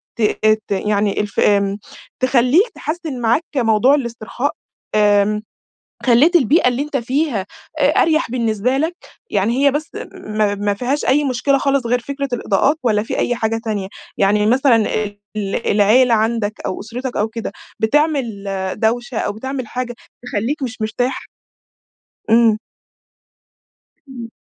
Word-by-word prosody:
ت 235 - -6 0.5
ت - - -14
يعني 205 0 0
الف 205 -1 -4
آمم 200 0 +2 0.4
تخلّيك 260 - +3
تحسّن 310 -5 -4
معاك 235 +8 +2
موضوع 240 +2 +4
الاسترخاء، 240 +1 -3 0.4
آمم 210 0 +3 0.6
خلّيت 275 +9 +5
البيئة 290 0 +4
اللي 250 +2 -1
أنتَ 295 -1 -3
فيها 250 -4 -1 0.3
أ 285 +1 +4
أريح 315 -4 +1
بالنسبة 230 0 0
لَك، 320 +5 -1 0.3
يعني 230 +8 +1
هي 280 - +6
بس 300 +3 -3 0.2
ما 215 -1 -1
ما 205 0 -1
فيهاش 255 +7 -1
أي 290 +3 +3
مُشكلة 275 +1 +1
خالص 275 -3 0
غير 245 +1 +2
فكرة 280 +3 -4
الإضاءات 245 +5 +1
والّا 215 -4 +2
في 225 - -4
أي 245 - +1
حاجة 225 0 -1
تانية؟ 205 -4 -2 0.3
يعني 210 +1 +3
مثلًا 255 +1 +4
ال 210 -2 -1 0.2
ال 200 +2 -3
العيلة 225 +4 +4
عندك 220 -1 0
أو - - -3
أسرتك 245 +4 -5
أو 210 - +1
كده 225 0 -5 0.3
بتعمل 245 -4 +1 0.3
دوشة 240 +1 -1
أو - - -1
بتعمل 260 +4 -5
حاجة 245 +1 -4 0.3
تخلّيك 245 +7 -2
مش 230 -4 -5
مرتاح؟ 245 +4 -2 1.0
إمم. 225 -1 +5 1.5
إمم. 235 -3 -8
235 Hz, 140 wpm, -18 LUFS, 215-270 Hz, 1.5 s, هي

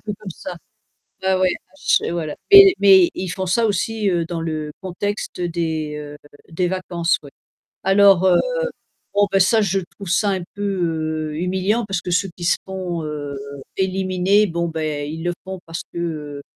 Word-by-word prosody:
peu 210 - -3
comme 205 -3 -8
ça. 175 +1 -7 0.7
Ouais, 190 - +2
ouais, 185 0 +3 0.2
bah - - -34
ch - - +2
et - - -3
voilà 160 -3 -3 0.2
mais 395 -2 +10
mais 190 -3 +7
ils 185 - -4
font 190 +2 -3
ça 225 +6 +2
aussi, 215 0 0
heu, 170 -2 +1
dans 170 0 -4
le 155 -2 -3
contexte 190 +1 -4
des, 160 -3 -2
heu, 150 0 -8 0.3
des 175 +2 0
vacances 175 -2 0
ouais. 140 - -12 0.5
Alors 195 -1 +5
heu, 180 - +5 0.8
bon 205 0 +4
ben 195 - +3
ça 220 +4 +4
je 195 0 +1 0.2
trouve 200 -3 -8
ça 200 +3 +2
un 190 -2 -1
peu, 205 - -6 0.7
heu, - - -6
humiliant 190 +6 0
parce 195 -3 -2
que 180 - -6
ceux 185 +1 +1
qui 175 - -6
se 180 - +3
font, 185 -3 -4
heu, 145 -2 -5 0.4
éliminer, 190 +2 +2
bon, 170 -1 -2
beh, 155 -2 -3
ils 160 +2 -6
le 175 - 0
font 190 0 -6
parce 165 0 -5
que, - - -6
heu 150 -4 -4
180 Hz, 190 wpm, -21 LUFS, 165-195 Hz, 0.8 s, mais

